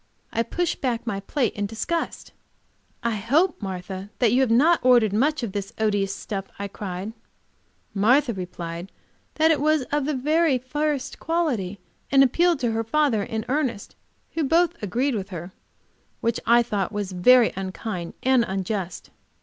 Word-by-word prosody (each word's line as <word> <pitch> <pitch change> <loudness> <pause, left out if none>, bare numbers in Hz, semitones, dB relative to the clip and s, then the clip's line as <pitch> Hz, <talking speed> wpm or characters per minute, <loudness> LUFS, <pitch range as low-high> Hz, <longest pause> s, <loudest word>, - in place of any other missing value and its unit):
I 230 - +1
pushed 340 +9 -2
back 240 -4 -1
my 205 -4 -2
plate 235 +4 -1
in 205 0 -2
disgust. 230 +11 -3 0.7
"I 230 -2 0
hope, 290 - +1
Martha, 190 0 -5
that 235 -4 +3
you 250 +3 +4
have 260 - +2
not 300 +9 +5
ordered 240 -5 +5
much 280 +6 +1
of 225 - -2
this 200 0 -5
odious 205 -3 0
stuff!" 195 -2 -5
I 200 - -4
cried. 195 +1 -5 0.8
Martha 240 +6 +3
replied 180 -1 -6 0.4
that 320 +1 +4
it 295 -3 +1
was 305 -1 +3
of 295 -1 +1
the 300 0 -1
very 300 +2 +2
first 285 +2 -2
quality, 255 - -1 0.3
and 275 0 +7
appealed 335 +4 +3
to 240 -2 +1
her 225 0 -1
father 265 -2 +2
and 220 +2 -3
Ernest, 255 -7 -2 0.4
who 325 - -1
both 335 +4 +3
agreed 245 +7 0
with 200 -3 -3
her, 175 0 -7 0.7
which 230 0 0
I 235 +1 +6
thought 205 -5 -1
very 205 +6 +4
unkind 185 -1 -5
and 260 -2 +4
unjust. 190 -1 -4
230 Hz, 160 wpm, -24 LUFS, 195-285 Hz, 0.8 s, and